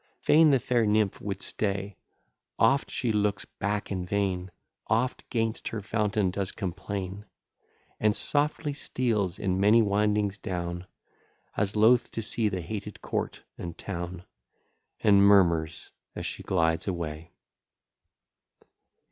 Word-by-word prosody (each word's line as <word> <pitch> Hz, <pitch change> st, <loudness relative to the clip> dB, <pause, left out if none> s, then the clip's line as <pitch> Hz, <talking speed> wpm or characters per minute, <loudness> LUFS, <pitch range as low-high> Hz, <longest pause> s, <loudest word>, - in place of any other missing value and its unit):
Fain 155 Hz, +1 st, +5 dB
the 135 Hz, -, +5 dB
fair 120 Hz, -2 st, +1 dB
nymph 105 Hz, -1 st, +1 dB
would 100 Hz, -1 st, -4 dB
stay, 100 Hz, -1 st, -2 dB, 0.6 s
Oft 140 Hz, +1 st, +3 dB
she 120 Hz, -3 st, -1 dB
looks 105 Hz, -1 st, 0 dB
back 105 Hz, +1 st, -3 dB
in 95 Hz, -2 st, -2 dB
vain, 95 Hz, -1 st, -1 dB, 0.4 s
Oft 115 Hz, +4 st, 0 dB
'gainst 115 Hz, -1 st, -1 dB
her 115 Hz, -, -3 dB
fountain 105 Hz, -3 st, 0 dB
does 100 Hz, 0 st, -2 dB
complain, 95 Hz, +1 st, -5 dB, 0.7 s
And 105 Hz, -1 st, +2 dB
softly 145 Hz, +2 st, 0 dB
steals 110 Hz, -10 st, -1 dB
in 95 Hz, -1 st, -1 dB
many 105 Hz, +4 st, +5 dB
windings 105 Hz, 0 st, +1 dB
down, 90 Hz, -1 st, -4 dB, 0.7 s
As 100 Hz, 0 st, 0 dB
loth 115 Hz, +3 st, +5 dB
to 115 Hz, -, -2 dB
see 110 Hz, 0 st, +1 dB
the 95 Hz, -2 st, -3 dB
hated 100 Hz, +3 st, -6 dB
court -, -, -3 dB, 0.2 s
and 85 Hz, -1 st, -6 dB
town; 90 Hz, -2 st, -5 dB, 0.8 s
And 100 Hz, -2 st, +6 dB
murmurs 85 Hz, -6 st, +3 dB, 0.2 s
as -, -, -5 dB
she -, -, -4 dB
glides 80 Hz, -2 st, 0 dB
away. 85 Hz, -3 st, -4 dB
100 Hz, 125 wpm, -28 LUFS, 95-110 Hz, 0.8 s, And